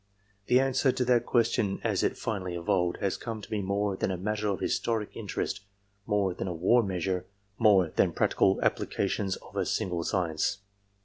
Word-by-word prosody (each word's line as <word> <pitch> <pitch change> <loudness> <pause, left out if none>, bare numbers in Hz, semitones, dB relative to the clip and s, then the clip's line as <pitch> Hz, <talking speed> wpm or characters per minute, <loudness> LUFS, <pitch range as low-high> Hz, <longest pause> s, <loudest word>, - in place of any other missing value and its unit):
The 125 - +5
answer 135 0 +2
to 125 0 -1
that 120 -1 +2
question 115 -4 +1
as - - +1
it - - 0
finally 95 -4 -3
evolved, 85 +1 0
has 100 - 0
come 115 -2 -5
to 105 - -11
be 105 -2 0
more 100 +1 0
than - - -1
a 95 - -2
matter 105 +3 -2
of 100 -4 -1
historic 110 -3 -1
interest, 100 -2 -3 0.5
more 100 -3 +1
than 95 - -4
a 90 - -3
war 95 +9 +4
measure, 95 -2 -2 0.3
monsL 95 -7 +4
than - - +3
practical 95 0 +2
applications 100 -1 0
of - - -15
a - - +1
single 90 -3 -1
science. 90 +1 -1
100 Hz, 180 wpm, -29 LUFS, 90-110 Hz, 0.5 s, The